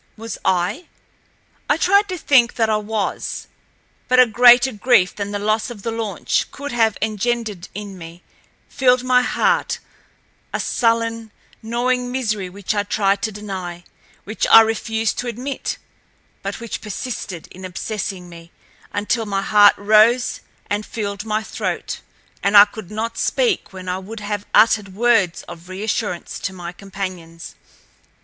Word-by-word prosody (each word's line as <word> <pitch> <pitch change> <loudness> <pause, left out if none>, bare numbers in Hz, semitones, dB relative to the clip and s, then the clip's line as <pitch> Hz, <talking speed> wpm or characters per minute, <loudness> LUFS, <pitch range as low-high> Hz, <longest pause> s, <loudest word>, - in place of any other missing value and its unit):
Was 225 0 -7
I? 185 - 0 0.8
I 290 - +3
tried 400 +4 +3
to 365 - -3
think 260 -7 +3
that 225 -2 +1
I 215 - +3
was. 210 -1 -3 0.6
But 255 0 +4
a 255 - +9
greater 245 +3 +6
grief 210 -4 +3
than 200 -1 -4
the 205 - -3
loss 215 +2 0
of 215 -5 -10
the 230 - -2
launch 225 -5 -1
could 285 +1 -7
have 225 -3 +2
engendered 220 -3 -2
in 200 -2 -7
me, 165 +1 -11 0.4
filled 255 -2 +2
my 255 0 +4
heart—a 250 - -3
sullen, 230 -1 0 0.3
gnawing 245 +2 -1
misery 215 -7 -2
which 200 +2 -3
I 205 - +1
tried 200 -1 0
to 220 - -1
deny—which 195 0 -6
I 225 - +9
refused 225 0 -1
to 245 - -3
admit—but 240 -4 -7
which 235 -1 -6
persisted 210 -5 -6
in 185 - -12
obsessing 185 0 -4
me 170 0 -13 0.4
until 210 +2 -1
my 195 -1 -1
heart 205 0 +6
rose 220 +4 +4 0.3
and 205 +1 -1
filled 205 -2 -5
my 215 0 -1
throat, - - -4 0.4
and 200 +1 +4
I 200 - +11
could 210 -2 -10
not 225 +2 -4
speak 480 -6 0
when 185 -1 -9
I 180 +1 -2
would 210 +4 -8
have 205 0 -4
uttered 210 -4 +3
words 225 -6 +2
of 170 +2 -12
reassurance 205 -1 -3
to 190 - -4
my 175 -2 -7
companions. 185 -3 -7
215 Hz, 145 wpm, -20 LUFS, 195-235 Hz, 0.8 s, I